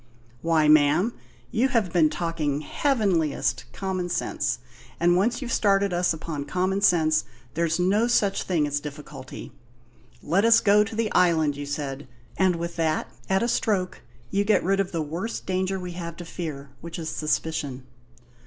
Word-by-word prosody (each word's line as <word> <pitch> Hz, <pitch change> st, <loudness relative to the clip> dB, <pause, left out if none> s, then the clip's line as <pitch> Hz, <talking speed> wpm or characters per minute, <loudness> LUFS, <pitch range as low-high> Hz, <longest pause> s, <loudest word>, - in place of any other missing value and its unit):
"Why, 165 Hz, -2 st, +3 dB
ma'am, 155 Hz, +8 st, +4 dB, 0.4 s
you 245 Hz, +3 st, +2 dB
have 230 Hz, -9 st, 0 dB
been 160 Hz, -4 st, +4 dB
talking 155 Hz, -4 st, -2 dB
heavenliest 195 Hz, -, 0 dB
common 185 Hz, -2 st, -3 dB
sense, -, -, -1 dB, 0.4 s
and 175 Hz, +1 st, +4 dB
once 235 Hz, +8 st, +1 dB
you've 235 Hz, -, -3 dB
started 200 Hz, -2 st, +2 dB
us 175 Hz, +1 st, +2 dB
upon 155 Hz, -3 st, -4 dB
common 185 Hz, +5 st, 0 dB
sense 155 Hz, -5 st, +3 dB, 0.3 s
there's 165 Hz, +1 st, 0 dB
no 200 Hz, +6 st, +3 dB
such 205 Hz, -5 st, +2 dB
thing 165 Hz, -5 st, +1 dB
as 145 Hz, 0 st, -1 dB
a -, -, -19 dB
difficulty. 145 Hz, -2 st, -9 dB, 0.7 s
'Let 180 Hz, +7 st, +2 dB
us 230 Hz, 0 st, +6 dB
go 210 Hz, 0 st, +5 dB
to 220 Hz, +1 st, -7 dB
the 220 Hz, -1 st, -1 dB
island,' 160 Hz, -5 st, +3 dB
you 145 Hz, 0 st, -6 dB
said; 140 Hz, -1 st, -4 dB, 0.3 s
and 185 Hz, -2 st, +2 dB
with 170 Hz, 0 st, -5 dB
that 160 Hz, -1 st, 0 dB, 0.2 s
at 190 Hz, +3 st, +2 dB
a -, -, +1 dB
stroke 205 Hz, -6 st, 0 dB, 0.3 s
you 200 Hz, -, +2 dB
get 210 Hz, +1 st, +2 dB
rid 195 Hz, +2 st, +1 dB
of 195 Hz, -1 st, 0 dB
the 165 Hz, -2 st, -1 dB
worst 170 Hz, +10 st, -4 dB
danger 190 Hz, +1 st, -1 dB
we 180 Hz, -1 st, -6 dB
have 170 Hz, -1 st, -6 dB
to 175 Hz, -, -8 dB
fear, 145 Hz, -5 st, -6 dB
which 170 Hz, 0 st, -7 dB
is 160 Hz, -2 st, -4 dB
suspicion. 150 Hz, -4 st, -2 dB
175 Hz, 170 wpm, -25 LUFS, 155-195 Hz, 0.7 s, us